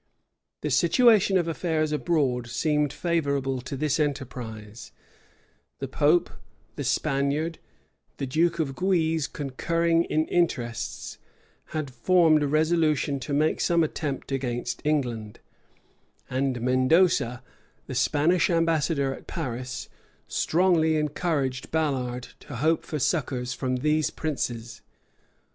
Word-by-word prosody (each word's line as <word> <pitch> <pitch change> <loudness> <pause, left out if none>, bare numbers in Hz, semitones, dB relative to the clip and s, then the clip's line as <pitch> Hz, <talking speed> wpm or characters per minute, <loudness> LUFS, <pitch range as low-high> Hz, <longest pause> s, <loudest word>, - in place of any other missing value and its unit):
[*] - - -58
The - - -2
situation 220 -6 +5
of 175 -2 0
affairs 160 -2 -1
abroad 145 -6 0
seemed 150 +2 0
favorable 140 -6 -1
to 130 +2 -6
this 150 +2 0
enterprise; 120 -7 -4 0.9
the 135 - -4
pope, 150 +6 +2 0.4
the 145 - -4
Spaniard, 140 +4 0 0.6
the 135 - -2
duke 165 +6 +1
of 145 -5 -2
Guise, 165 -4 +1
concurring 165 +4 0
in 155 +1 +1
interests, 125 -11 -2 0.5
had 155 -4 -4
formed 160 +3 +4
a 145 - +1
resolution 155 -2 +1
to 130 +3 -6
make 150 +2 +1
some 170 -1 +3
attempt 145 -3 -3
against 125 -3 -2
England: 120 -8 -1 0.9
and 130 -1 0
Mendoza, 130 0 +2 0.4
the - - -6
Spanish 160 +5 +2
ambassador 165 -4 +1
at - - -12
Paris, 130 -4 -4 0.4
strongly 165 -2 +2
encouraged 150 -4 -1
Ballard 130 -6 -1
to 145 - -9
hope 155 +6 +1
for 155 - -3
succors 125 -4 -1
from 130 0 -2
these 150 +4 +1
princes. 120 -6 -4
150 Hz, 115 wpm, -26 LUFS, 130-165 Hz, 0.9 s, situation